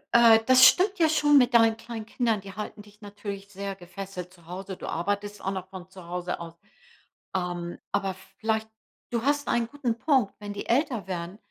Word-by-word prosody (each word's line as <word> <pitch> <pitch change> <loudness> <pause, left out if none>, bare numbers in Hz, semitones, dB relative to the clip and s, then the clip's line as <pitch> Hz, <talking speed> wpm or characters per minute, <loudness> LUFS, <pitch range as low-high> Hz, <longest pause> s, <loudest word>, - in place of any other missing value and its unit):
Äh, 230 -1 +8
das 255 0 +8
stimmt 385 0 +3
ja 320 -1 +5
schon 295 -2 +5
mit 250 -1 +2
deinen 225 -1 +6
kleinen 225 -1 -7
Kindern. 230 -1 0
Die 195 0 -10
halten 210 0 -7
dich 210 +1 -20
natürlich 200 -1 -7
sehr 200 0 -5
gefesselt 180 0 -8
zu 170 -3 -20
Hause. 190 +2 -7
Du - - -8
arbeitest 205 +4 -2
auch 195 - -1
noch 190 -1 -5
von 185 -1 -10
zu 185 -2 -12
Hause 180 0 -3
aus. 165 -1 -8 0.8
Ähm, 175 -1 -3
aber 195 -2 -1 0.2
vielleicht 220 0 0 0.4
du 235 -1 -1
hast 285 +1 +1
einen 235 -1 +1
guten 245 -4 -2
Punkt, 265 -9 +2
wenn 205 -1 -6
die 205 - -6
älter 245 - +1
werden, 180 +1 -5
205 Hz, 195 wpm, -27 LUFS, 190-235 Hz, 0.8 s, Äh